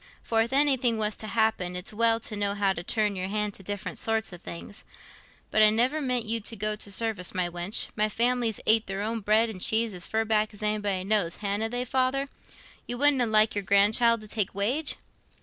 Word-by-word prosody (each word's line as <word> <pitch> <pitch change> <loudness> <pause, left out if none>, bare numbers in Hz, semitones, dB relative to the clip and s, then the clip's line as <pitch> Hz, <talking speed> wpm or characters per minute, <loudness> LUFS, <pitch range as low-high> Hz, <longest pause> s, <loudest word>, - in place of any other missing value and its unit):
For 225 -1 +1
if 230 +2 -1
anything 265 -4 +2
was 215 -1 -1
t' 215 - -8
happen, 215 -5 0
it's 180 +3 -5
well 230 +1 +2
to 215 - -4
know 205 -1 -1
how 200 -1 +1
to 165 - -5
turn 210 +2 -1
your 185 0 -3
hand 210 +1 -2
to - - -11
different 205 +1 -5
sorts 220 -3 -1
o' - - -7
things. 175 +4 -10 0.7
But 215 - +3
I 215 - +8
niver 250 +8 +1
meant 250 -4 0
you 230 +1 0
to 225 +2 -5
go 215 0 -1
to 210 -1 -8
service, 200 -3 -2
my 180 -1 0
wench; 175 +4 -2
my 215 0 +1
family's 235 -1 +1
ate 220 0 +4
their 195 +1 -3
own 225 +2 -2
bread 215 +2 +3
and 205 -5 -8
cheese 220 +1 +2
as 180 -1 -3
fur 220 0 0
back 215 -1 0
as 205 - -9
anybody 205 -3 -1
knows, 195 -4 +1
hanna 205 +2 -2
they, 245 +1 -2
Father? 265 +2 0 0.6
You 245 - -3
wouldna 275 -3 +3
like 215 0 +4
your 205 - -2
grand 200 +2 +4
child 230 -1 +3
to 215 - -8
take 205 -3 -2
wage?" 255 +10 0
215 Hz, 220 wpm, -27 LUFS, 200-230 Hz, 0.7 s, I